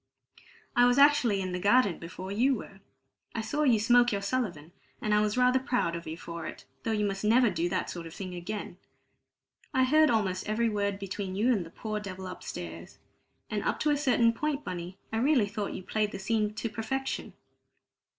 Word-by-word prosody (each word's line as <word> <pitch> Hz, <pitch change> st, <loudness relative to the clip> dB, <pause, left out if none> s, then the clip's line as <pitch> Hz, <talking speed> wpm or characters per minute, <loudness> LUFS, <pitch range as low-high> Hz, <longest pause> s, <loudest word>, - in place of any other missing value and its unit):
I 245 Hz, 0 st, +6 dB
was 245 Hz, +1 st, +3 dB
actually 280 Hz, -8 st, +5 dB
in 185 Hz, -1 st, -3 dB
the 180 Hz, -, -2 dB
garden 205 Hz, -1 st, +3 dB
before 185 Hz, +3 st, -7 dB
you 255 Hz, +6 st, +3 dB
were. 195 Hz, -3 st, -9 dB, 0.6 s
I 225 Hz, -, -1 dB
saw 290 Hz, +7 st, -2 dB
you 250 Hz, -7 st, +4 dB
smoke 240 Hz, +2 st, +5 dB
your 200 Hz, -1 st, -2 dB
Sullivan, 195 Hz, -9 st, -2 dB, 0.3 s
and 215 Hz, -, 0 dB
I 210 Hz, -, +4 dB
was 210 Hz, +2 st, 0 dB
rather 250 Hz, +1 st, +4 dB
proud 245 Hz, -10 st, 0 dB
of 170 Hz, -, -7 dB
you 160 Hz, +1 st, -5 dB
for 170 Hz, -1 st, -6 dB
it, -, -, -9 dB, 0.2 s
though 225 Hz, -, -2 dB
you 210 Hz, -1 st, +1 dB
must 195 Hz, 0 st, -2 dB
never 230 Hz, +1 st, +4 dB
do 175 Hz, 0 st, -1 dB
that 185 Hz, 0 st, -1 dB
sort 170 Hz, -2 st, -6 dB
of 165 Hz, -, -11 dB
thing 185 Hz, -2 st, -6 dB
again. 200 Hz, +4 st, -5 dB, 1.0 s
I 260 Hz, -, +5 dB
heard 310 Hz, +4 st, +5 dB
almost 200 Hz, -4 st, 0 dB
every 230 Hz, +2 st, +2 dB
word 200 Hz, -2 st, -1 dB
between 195 Hz, -1 st, -5 dB
you 235 Hz, +6 st, +3 dB
and 200 Hz, -6 st, 0 dB
the 165 Hz, -, -11 dB
poor 215 Hz, +4 st, -4 dB
devil 190 Hz, -2 st, -7 dB
upstairs. 85 Hz, -, -7 dB, 0.5 s
And 210 Hz, -1 st, -2 dB
up -, -, -1 dB
to 300 Hz, -, +3 dB
a -, -, +3 dB
certain 250 Hz, -5 st, +3 dB
point, 295 Hz, +3 st, -2 dB
Bunny, 180 Hz, +1 st, -6 dB, 0.2 s
I -, -, +1 dB
really 255 Hz, -1 st, +3 dB
thought 205 Hz, 0 st, -4 dB
you -, -, -6 dB
played 210 Hz, +2 st, -1 dB
the -, -, -3 dB
scene 210 Hz, +1 st, 0 dB
to 230 Hz, -, -2 dB
perfection." 225 Hz, +5 st, -3 dB
210 Hz, 205 wpm, -29 LUFS, 185-245 Hz, 1.0 s, I